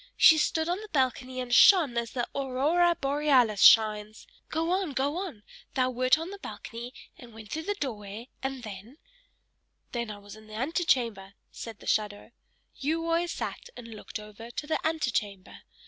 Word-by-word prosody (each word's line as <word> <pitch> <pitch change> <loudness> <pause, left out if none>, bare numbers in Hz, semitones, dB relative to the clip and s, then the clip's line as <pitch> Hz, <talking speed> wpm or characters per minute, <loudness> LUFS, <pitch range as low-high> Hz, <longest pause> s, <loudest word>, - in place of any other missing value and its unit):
She 315 - +7
stood 320 +1 0
on 355 +3 -1
the 430 - -9
balcony 260 -4 -1
and 250 -1 -3
shone 325 -6 +7
as 235 -1 -2
the 245 -3 -2
Aurora 290 +6 +2
Borealis 275 -7 +2
shines. 215 -1 +5 0.2
Go 325 +2 -1
on, 370 -5 0
go 280 +4 -1
on 345 - -6 0.3
thou 255 -1 +2
wert 255 +3 +3
on 330 +4 -6
the 400 - -9
balcony, 235 -8 -8 0.3
and 235 -3 -13
went 220 -2 -12
through 320 +1 -4
the 410 - +1
doorway, 220 - -6
and 265 -1 -4
then 215 +5 -9 0.5
" - - -47
"Then 235 -2 -3
I 210 - -6
was 205 0 -12
in 215 0 -15
the 215 - -10
antechamber," 235 - 0 0.2
said 225 -3 -8
the - - -12
shadow. 210 +1 -1 0.5
"You 320 +4 -1
always 335 +1 +1
sat - - -5
and 230 -1 -9
looked 220 0 -7
over 210 +2 -11
to 240 - -5
the 315 - -1
antechamber. 230 -12 -2
255 Hz, 180 wpm, -28 LUFS, 220-315 Hz, 0.5 s, She